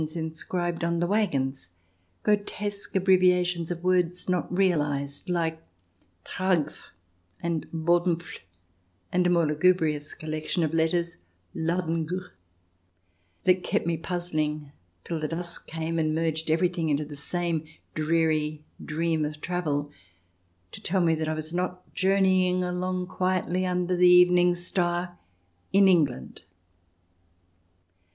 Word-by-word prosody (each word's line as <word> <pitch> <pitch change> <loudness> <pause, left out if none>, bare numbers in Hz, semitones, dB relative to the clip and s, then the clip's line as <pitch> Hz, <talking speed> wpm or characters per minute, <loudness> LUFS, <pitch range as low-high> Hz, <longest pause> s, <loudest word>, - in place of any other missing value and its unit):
II] 155 - -1
HAREM - - -15
SKIRTS 160 +1 -4
19 160 - -4
inscribed 175 +1 -3
on 170 0 0
waggons 135 - 0 0.3
— 90 0 -42
grotesque 205 -1 -1
abbreviations 180 -2 +3
of 175 -1 -4
words 180 -1 +1
not 180 -2 0
realized, 150 -5 0
like 165 -2 -1 0.6
Tragf, 185 -5 -1 0.5
and 170 -2 -2
Bodenfl, 170 +1 0 0.7
and 180 0 +2
a - - +3
more 170 -2 +3
lugubrious 155 -1 +1
collection 155 +2 -2
of 155 0 -1
letters, 170 +1 +1 0.4
Ladengew 165 +1 -2 0.5
— 90 -1 -42
that 185 0 +4
kept - - 0
me 170 0 +1
puzzling 155 -4 -3 0.3
till 165 - -3
the 155 - -1
dusk 170 +2 -5
came 165 +1 -2
and 155 -1 +1
merged 160 0 -1
everything 170 0 +1
into 150 +1 +1
the 145 0 -9
same 170 +2 -2 0.3
dreary 155 -1 0 0.2
dream 160 0 0
of 150 0 -4
travel, 150 -4 -2 0.8
to - - -9
tell 185 +1 +1
me 165 -2 +3
that 155 -1 -2
I 155 - -1
was 155 +1 -5
not 180 0 -3
journeying 185 -1 +3
along 180 0 -2
quietly 185 0 0
under 180 0 0
the 180 0 +6
evening 180 0 +6
star 175 0 -2 0.5
in 195 0 +6
England. 155 - +1
170 Hz, 130 wpm, -27 LUFS, 155-180 Hz, 0.8 s, the